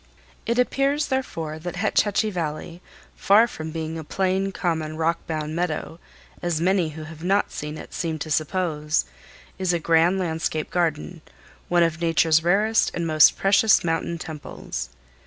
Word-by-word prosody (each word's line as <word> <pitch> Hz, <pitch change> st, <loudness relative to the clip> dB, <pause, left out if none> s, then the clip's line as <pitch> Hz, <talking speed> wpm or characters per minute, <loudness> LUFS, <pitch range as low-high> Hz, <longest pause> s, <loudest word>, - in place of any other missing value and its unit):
It 235 Hz, +1 st, 0 dB
appears, 275 Hz, +4 st, +1 dB
therefore, 165 Hz, -, -3 dB
that 175 Hz, +2 st, -6 dB
Hetch 215 Hz, +4 st, +2 dB
Hetchy 215 Hz, +1 st, 0 dB
Valley, 170 Hz, 0 st, -4 dB, 0.3 s
far 210 Hz, +4 st, +5 dB
from 160 Hz, -7 st, -7 dB
being 160 Hz, 0 st, -4 dB
a -, -, -6 dB
plain, 190 Hz, +4 st, 0 dB
common, 160 Hz, -4 st, -2 dB
rock 165 Hz, +1 st, +1 dB
bound 155 Hz, -1 st, -3 dB
meadow, 165 Hz, -1 st, -3 dB, 0.4 s
as 175 Hz, -3 st, -1 dB
many 180 Hz, -1 st, +2 dB
who 155 Hz, -, -6 dB
have 160 Hz, +1 st, -10 dB
not 195 Hz, +3 st, +1 dB
seen 150 Hz, +1 st, -6 dB
it -, -, -10 dB
seem 165 Hz, -2 st, -2 dB
to 155 Hz, +1 st, -6 dB
suppose, 155 Hz, -, 0 dB, 0.5 s
is 185 Hz, -2 st, +1 dB
a 170 Hz, -, +1 dB
grand 165 Hz, +3 st, +3 dB
landscape 160 Hz, -3 st, -2 dB
garden, 170 Hz, -1 st, -1 dB, 0.5 s
one 175 Hz, -1 st, +4 dB
of 165 Hz, 0 st, -1 dB
Nature's 165 Hz, -1 st, +3 dB
rarest 210 Hz, +6 st, +3 dB
and 170 Hz, -, -2 dB
most 155 Hz, -2 st, +5 dB
precious 200 Hz, +2 st, +4 dB
mountain 165 Hz, 0 st, -1 dB
temples. 150 Hz, -, -6 dB
165 Hz, 155 wpm, -24 LUFS, 155-190 Hz, 0.5 s, far